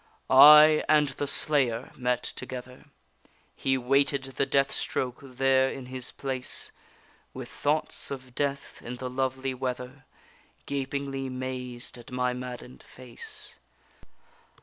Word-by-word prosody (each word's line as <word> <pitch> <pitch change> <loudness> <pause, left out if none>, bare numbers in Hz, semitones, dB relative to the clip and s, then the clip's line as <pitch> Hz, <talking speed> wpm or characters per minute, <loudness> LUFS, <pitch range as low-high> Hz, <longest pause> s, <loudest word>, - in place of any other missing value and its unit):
I 150 +3 +9
and 150 -2 +4
the 140 +2 -4
slayer 135 -6 +2
met 125 -1 -1
together, 130 +1 -8 0.7
He 135 0 0
waited 135 +2 +2
the 135 0 -2
death 135 0 +2
stroke 125 -2 -2
there 135 0 +2
in 135 -1 -7
his 130 0 -7
place, 130 -2 -2 0.6
With - - -7
thoughts 150 +2 -1
of 130 -2 -8
death, 140 +1 -3
in 125 +2 -6
the 125 0 -6
lovely 130 0 -2
weather, 125 +1 -5 0.6
Gapingly 135 -1 -3
mazed 125 -1 -5
at 120 - -13
my 125 0 0
madden'd 125 0 -8
face. 125 -2 -5
130 Hz, 120 wpm, -27 LUFS, 125-140 Hz, 0.7 s, I